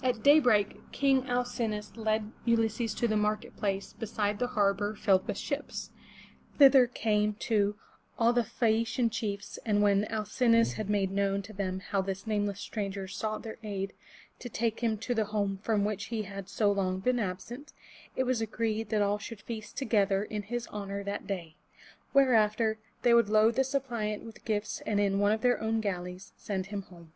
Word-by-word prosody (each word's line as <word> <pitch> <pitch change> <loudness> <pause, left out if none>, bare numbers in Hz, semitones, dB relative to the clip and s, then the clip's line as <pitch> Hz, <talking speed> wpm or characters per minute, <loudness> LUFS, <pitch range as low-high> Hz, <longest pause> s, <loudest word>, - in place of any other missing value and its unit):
At 250 -4 0
daybreak, 250 -9 +5
King 270 -2 +2
Al 245 0 +2
cin'o 230 -3 -2
us 210 0 -9
led 220 -1 -1
Ulysses 225 -1 +1
to 235 - +1
the 215 - 0
market 210 0 -1
place 195 -2 -2
beside 210 -2 -2
the 245 - +1
harbor 205 -3 +1
filled 190 -2 +2
with - - -2
ships. - - -4 0.7
Thither 270 -3 +8
came, 210 -3 0
too, 210 -2 +1 0.4
all 230 +1 +4
the 240 - +3
Phae 225 0 +1
a'ci 230 +2 -4
an 235 -3 +2
chiefs, 205 -2 -4
and 205 -2 +2
when 200 0 +3
Al 215 0 -2
cin'o 230 +2 +3
us 230 - +2
had 215 -2 -4
made 200 -2 +1
known 200 0 0
to 215 - -11
them 190 -1 -3
how 195 +1 -1
that 190 - -7
this 190 0 -4
nameless 205 -2 -1
stranger 200 -3 -4
sought 215 +3 -3
their 220 -1 -7
aid 195 -2 -4 0.5
to 245 - -7
take 230 0 -1
him 225 -2 0
to 245 +4 -2
the 220 -2 +1
home 200 -2 -1
from 210 -2 +1
which 205 -1 -2
he 225 -2 -3
had 195 -1 -8
so 205 0 +2
long 190 -2 0
been 250 +5 +1
absent, 220 +8 -5 0.4
it 260 - +1
was 255 -2 0
agreed 225 -1 -2
that 210 -2 +2
all 205 +1 +1
should 215 0 -8
feast 215 -2 -7
together 205 -6 +2
in 210 0 -4
his 240 +3 -4
honor 200 -1 -4
that 200 +1 -4
day; 170 -5 -5 0.5
whereafter 220 -4 +3 0.2
they 240 - +5
would 235 -3 +5
load 215 +2 +5
the 265 - +2
suppliant 240 -6 -2
with 225 -1 -12
gifts 215 -1 -2
and 205 -1 +1
in 200 -1 +2
one 205 +1 +3
of 220 0 0
their 245 -1 +2
own 225 0 0
galleys 180 -2 -4
send 190 -3 -3
him 200 +1 -4
home. 170 -3 -15
215 Hz, 200 wpm, -30 LUFS, 200-230 Hz, 0.7 s, Thither